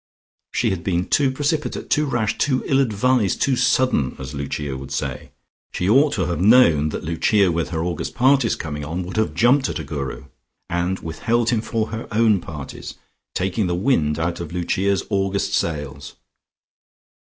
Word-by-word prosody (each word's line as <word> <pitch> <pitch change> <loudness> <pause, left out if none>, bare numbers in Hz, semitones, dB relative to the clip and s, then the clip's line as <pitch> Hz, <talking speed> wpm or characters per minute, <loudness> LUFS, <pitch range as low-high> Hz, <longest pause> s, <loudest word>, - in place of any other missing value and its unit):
She - - +1
had 90 -3 -3
been 90 -1 0
too 140 -2 +2
precipitate, 145 +3 -2
too 150 0 +2
rash, 120 -5 0
too 130 -3 +1
ill 135 - +2
advised, 120 -3 +1
too 135 - +2
sudden, 125 - +2
as 65 +1 -7
Lucia 70 0 -4
would 65 +1 -8
say. - - -4 0.4
She 90 - -1
ought 135 +8 +5
to 95 - 0
have 85 0 -2
known 95 - +5
that - - -5
Lucia, 90 +4 +2
with 85 0 -1
her 80 -2 -2
August 85 -2 -3
parties 130 -2 +3
coming 75 -2 -5
on, 85 +5 -3
would 90 +4 -7
have 110 - 0
jumped 130 +3 +3
at - - -3
a - - -5
Guru, 70 -4 -5 0.5
and 90 +2 0
withheld 115 +9 0
him 115 -3 +1
for 110 -1 -2
her 110 +1 -5
own 110 -2 +3
parties, 75 -4 -8 0.4
taking 95 +2 0
the 90 - 0
wind 85 - +1
out 85 +1 -2
of 85 -2 -6
Lucia's 95 +3 0
August 95 0 0
sails. 75 -4 -3
95 Hz, 175 wpm, -21 LUFS, 80-120 Hz, 0.5 s, ought